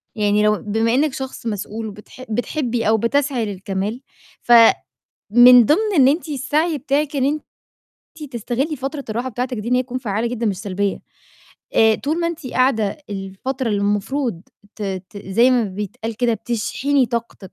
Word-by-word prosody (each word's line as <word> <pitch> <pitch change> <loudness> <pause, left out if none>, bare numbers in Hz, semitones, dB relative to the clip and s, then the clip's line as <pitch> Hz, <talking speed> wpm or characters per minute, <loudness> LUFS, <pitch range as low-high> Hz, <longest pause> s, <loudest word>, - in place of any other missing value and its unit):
يعني 210 0 +2
لو 210 0 +3
بما 225 +2 0
إنِّك 290 0 +2
شخص 265 -3 -6
مسؤول 215 +1 -4
وبتح 210 +5 -11
بتحبي 245 0 -1
أو 220 - +4
بتسعي 255 +1 0
للكمال 200 +4 -4 0.4
فمن 235 -1 +5 0.7
ضِمْن 300 - +4 0.2
إن 260 -1 +6
أنتِ 315 +2 -1
السعي 295 +3 0
بتاعِك 285 +3 -1
إن 265 - +2 0.7
أنتِ 300 -4 -13
تستغلي 255 +6 -2
فترة 275 +2 -5
الراحة 240 +4 -2
بتاعتِك 245 0 -3
دي 215 +3 -5
إن 250 - +2
هي 255 - +2
تكون 255 0 -4
فعّالة 220 -1 -2
جدًا 235 -1 -2
مش 195 -3 -1
سلبية، 200 -1 -2 0.8
آآ، 220 -1 +5
طول 310 +4 -2
ما 335 - +1
أنتِ 330 -5 -6
قاعدة 245 -6 +1
الفترة 205 +7 -4
اللي 205 -1 0
المفروض 205 0 -1 0.3
ت 215 - -7 0.3
ت 200 - -9
زَي 235 +7 +4
ما 245 -3 +3
بيتقال 210 +3 -5
كده 240 -2 +1
بتشحني 245 +5 0
طاقتِك، 230 -5 -5
235 Hz, 160 wpm, -20 LUFS, 210-265 Hz, 0.8 s, إن